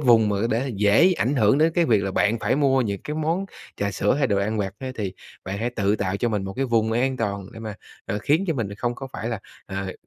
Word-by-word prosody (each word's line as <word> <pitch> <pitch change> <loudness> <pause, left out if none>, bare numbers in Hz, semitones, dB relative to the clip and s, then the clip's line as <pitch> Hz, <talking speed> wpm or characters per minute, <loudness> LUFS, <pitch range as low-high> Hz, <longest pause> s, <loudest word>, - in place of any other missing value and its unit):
vùng 115 -6 +5
mà 100 - 0
để 125 +4 0
dễ 105 - +5
ảnh 130 +5 +1
hưởng 110 +4 +4
đến 160 +1 +4
cái 170 -1 +3
việc 110 -5 +3
là 95 - -1
bạn 105 +4 +2
phải 130 - +1
mua 135 -2 +3
những 100 -3 -3
cái 150 - -4
món 165 +5 0 0.3
trà 100 0 -1
sữa, 100 +3 +1
hay 140 0 +2
đồ 100 -5 +1
ăn 105 +2 -1
vặt 95 -1 -2
ấy 130 -1 -5
thì 100 -6 -4 0.3
bạn 95 +2 -4
hãy 120 +2 -1
tự 105 -2 +1
tạo 95 -1 -1
cho 120 - 0
mình 105 -4 -1
một 95 - -5
cái 135 - 0
vùng 115 -3 +1
an 130 +3 +1
toàn 100 -4 -2
để 115 - -10
mà, 110 -2 -5 0.3
ờ, 105 - -2
khiến 155 - +2
cho 165 - +2
mình 100 -5 -3
không 120 +3 -2
có 135 +1 -7
phải 110 - -4
là, 115 -4 -3 0.3
ờ, 95 -1 -4
110 Hz, 275 wpm, -24 LUFS, 100-130 Hz, 0.3 s, vùng